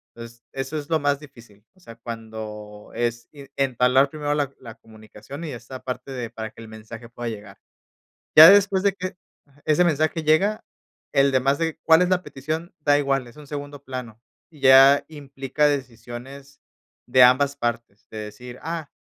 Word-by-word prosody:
Es 115 0 -12
eso 135 +3 -4
es 150 0 -7
lo 160 -1 +2
más 145 0 0
difícil. 115 -8 -16
O - - -25
sea, 115 -11 -13
cuando 110 -2 -9
es 120 0 -2
i 145 - -13
en 135 0 -15
entablar 130 +1 +2
primero 145 -1 -2
la 145 -2 -1
la 115 -3 -11
comunicación 110 +6 -12
y 155 - -5
esta 125 +1 -9
parte 125 +1 -6
de 125 -3 -5
para 110 -1 -7
que 115 - -14
el 115 - -10
mensaje 110 +1 -11
pueda 120 0 -6
llegar. 105 -3 -9 0.8
Ya 160 +2 +12
después 200 -1 +4
de 200 - +3
que 185 -1 -6 0.3
ajá, 140 0 -26
ese 155 +3 +3
mensaje 155 0 0
llega, 195 +8 +2 0.5
el 140 -1 +3
demás 135 +2 +2
de 165 -1 -2
cuál 160 0 +6
es 180 - +1
la 180 -1 +2
petición 160 +6 -6
da 145 -1 +3
igual, 135 -2 0
es 120 - -15
un 150 -1 -13
segundo 145 0 -7
plano. 120 -4 -7 0.3
Y 150 -4 -18
ya 135 +1 +7
implica 140 -1 -2
decisiones 135 0 -6 0.5
de 125 +1 +5
ambas 140 +3 +4
partes, 115 -4 -4
de 110 - -8
decir, 120 +4 -9
ah, 165 -3 -5
135 Hz, 185 wpm, -23 LUFS, 115-150 Hz, 0.8 s, Ya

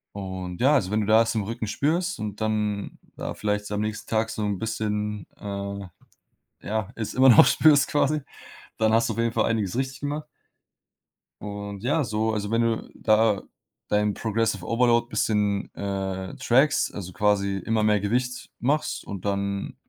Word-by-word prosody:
Und 95 -2 -6
ja, 140 +4 +5
also, 100 -9 +1
wenn 110 +1 +2
du 105 - -2
da 110 +1 +6
es 115 +1 -2
im 110 - 0
Rücken 110 +2 -4
spürst 170 - 0
und 105 -1 -5
dann 105 -2 -1 0.2
da - - -4
vielleicht 105 0 -2
am 105 - -1
nächsten 110 0 -4
Tag 110 0 +1
so 110 -1 -3
'n 100 -2 -2
bisschen, 105 -2 -2
äh, 100 -1 -5 0.8
ja, 110 -1 -2
es 110 -2 -4
immernoch 130 -3 +8
spürst 150 -3 +5
quasi. 150 +1 +1 0.6
Dann 110 -1 +2
hast 115 +1 +3
du - - -1
auf - - -3
jeden 115 0 +1
Fall - - +1
einiges 110 -3 0
richtig 130 +1 -2
gemacht. 145 +1 -3 1.2
Und 100 -1 -6
ja, 145 +5 +2
so, 110 -1 -1
also, 105 -1 -2
wenn 115 +1 +2
du 115 -1 -1
da 110 -2 +3 0.5
dein 105 0 +2
Progressive 110 -3 -1
Overload 120 +1 +2
bisschen, 105 -4 0
äh, 95 -2 -3
trackst, 135 +5 +3
also, 95 -3 -6
quasi 100 0 +1
immer 110 -1 +1
mehr 105 -1 +3
Gewicht 125 +5 -2
machst 145 +5 0
und 100 -2 -7
dann 100 0 -2
110 Hz, 170 wpm, -25 LUFS, 100-115 Hz, 1.2 s, immernoch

